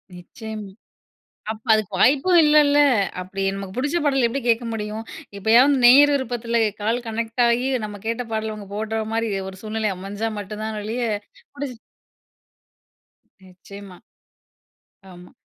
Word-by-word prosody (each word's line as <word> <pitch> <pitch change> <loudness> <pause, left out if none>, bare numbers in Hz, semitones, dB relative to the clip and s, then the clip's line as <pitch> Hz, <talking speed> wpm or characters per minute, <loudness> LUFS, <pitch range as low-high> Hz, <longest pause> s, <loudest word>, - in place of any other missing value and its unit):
நிச்சியமா. 215 +3 -9 0.8
அப்ப 220 +2 -10
அதுக்கு 215 -2 0
வாய்ப்பும் 295 +7 +4
இல்லைல்ல. 295 -1 +5 0.4
அப்டி 190 +2 -6
நமக்கு 195 0 -7
புடிச்ச 290 +6 0
பாடல் 270 -4 +2
எப்டி 265 +4 -3
கேட்க 235 +1 +2
முடியும்? 215 0 -5 0.3
எப்பயாவது 235 +8 +5
நேயர் 285 +4 +7
விருப்பத்தில 235 -3 -1 0.2
கால் 230 +4 -1
கனெக்ட் 225 +2 -2
ஆயி 240 +2 +1 0.2
நம்ம 205 -1 -6
கேட்ட 230 +2 -2
பாடல் 220 0 -2
அவங்க 210 -2 -9
போடுற 220 +1 -2
மாரி 225 0 0 0.2
ஒரு 190 - -12
சூழ்நிலை 215 -1 -2
அமைஞ்சா 200 +4 -4
மட்டும் 210 +1 -7
தான் 220 -1 -4
ஒளிய 225 +4 -4 0.5
புடிச்ச 275 -4 -6 1.7
நிச்சியமா 185 +1 -13 1.1
ஆமா. 180 0 -14
225 Hz, 130 wpm, -22 LUFS, 210-250 Hz, 1.7 s, நேயர்